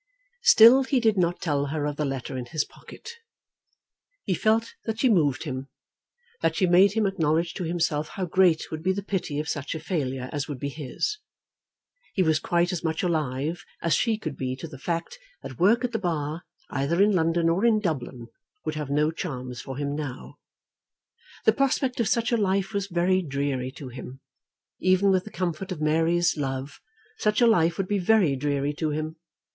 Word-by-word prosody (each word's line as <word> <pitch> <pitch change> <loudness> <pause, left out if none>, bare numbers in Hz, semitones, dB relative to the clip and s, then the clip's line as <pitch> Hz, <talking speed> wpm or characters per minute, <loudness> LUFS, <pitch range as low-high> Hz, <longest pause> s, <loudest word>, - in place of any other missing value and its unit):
Still 260 - +8
he 265 0 +1
did 220 -3 +3
not 175 -2 +1
tell 145 -4 0
her 150 0 -2
of 145 -1 -2
the 150 - -1
letter 135 -1 -4
in 125 -1 -5
his 150 +4 -1
pocket. 465 - -12 1.1
He - - 0
felt 225 +1 +1
that 225 0 -3
she 260 - +4
moved 150 - +2
him, 135 -3 -5 0.7
that - - +1
she 190 - +2
made 185 +3 +5
him 220 -1 +1
acknowledge 165 -2 +1
to 180 - -4
himself 160 -3 0
how 190 +2 -4
great 175 -2 +2
would 155 -1 -4
be 190 +3 +1
the 200 +1 -4
pity 185 -7 -3
of 150 0 -2
such 145 +2 -3
a - - -4
failure 135 -8 -3
as 145 -2 -2
would 145 -3 -5
be 140 - -3
his. 155 - -3 1.0
He 190 - +3
was 160 -2 +2
quite 175 +2 +1
as 180 -2 -4
much 160 -1 -1
alive 155 -1 -1 0.2
as 165 - +1
she 225 -2 +2
could 155 -10 -5
be 130 -1 -3
to 135 +5 -7
the 140 -4 -11
fact 170 - -3 0.2
that 130 - -9
work 225 +7 +4
at 250 - -1
the 225 - -1
Bar, 160 -2 -3 0.3
either 145 +5 0
in 205 +2 +5
London 165 -2 +2
or 170 +5 +1
in 230 -2 +4
Dublin, 135 - -3 0.4
would 155 - -1
have 150 -2 -4
no 150 +2 +2
charms 130 -7 -5
for 135 -1 -7
him 145 0 -2
now. 145 -4 -6 1.1
The - - +6
prospect 265 -2 0
of 230 - +2
such 235 +3 +1
a 235 - +3
life 195 -1 0
was 200 -1 -1
very 185 +1 +2
dreary 140 -4 -2
to 135 -2 -8
him. 130 +1 -9 0.6
Even 185 +2 +3
with 185 -1 +1
the - - -8
comfort 180 +1 -3
of 180 - -4
Mary's 165 +2 +2
love 135 0 -4 0.4
such 210 0 +1
a 240 - +5
life 170 -7 +3
would 195 - -1
be 205 0 0
very 185 -6 +3
dreary 145 +1 -1
to 155 +1 -2
him. 155 +2 -3
165 Hz, 195 wpm, -26 LUFS, 145-195 Hz, 1.1 s, Still